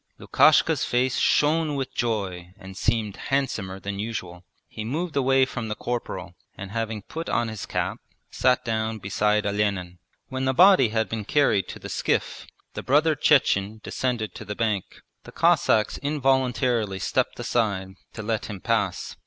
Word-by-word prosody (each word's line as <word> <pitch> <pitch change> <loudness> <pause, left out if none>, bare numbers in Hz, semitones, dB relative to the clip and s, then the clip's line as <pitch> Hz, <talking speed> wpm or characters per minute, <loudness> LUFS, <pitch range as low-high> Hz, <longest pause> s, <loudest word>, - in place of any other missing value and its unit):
Lukashka's - - +4
face 125 +1 +1
shone 155 0 +2
with 135 -2 -3
joy 95 -6 -3
and 95 -2 -11
seemed 110 0 -1
handsomer 110 -9 -1
than 100 +1 -5
usual. 100 -5 -5 0.2
He 110 - -7
moved 155 +8 -3
away 135 -1 +3
from 120 -3 -5
the 105 - -3
corporal, 95 -8 -4 0.2
and 95 0 -7
having 110 -2 -3
put 165 +7 -6
on 120 - 0
his 110 -2 -6
cap - - -2 0.3
sat 125 -1 +2
down 110 -1 -1
beside 105 +1 0
Olenin. 100 -4 -1 0.3
When 130 -1 -3
the 130 0 +1
body 185 - +6
had 110 0 0
been 110 -2 -4
carried 110 -6 +2
to - - -7
the - - -9
skiff - - -2 0.3
the - - -5
brother 150 +4 +3
Chechen 110 -8 +2
descended 115 -7 -2
to - - -8
the 105 - -6
bank. 110 -4 -2 0.2
The - - -12
Cossacks 110 -1 +2
involuntarily 130 -7 +1
stepped - - -1
aside 100 -5 -1 0.2
to 110 - -7
let 110 0 -2
him 100 -2 -6
pass. - - -1
110 Hz, 160 wpm, -25 LUFS, 100-130 Hz, 0.3 s, body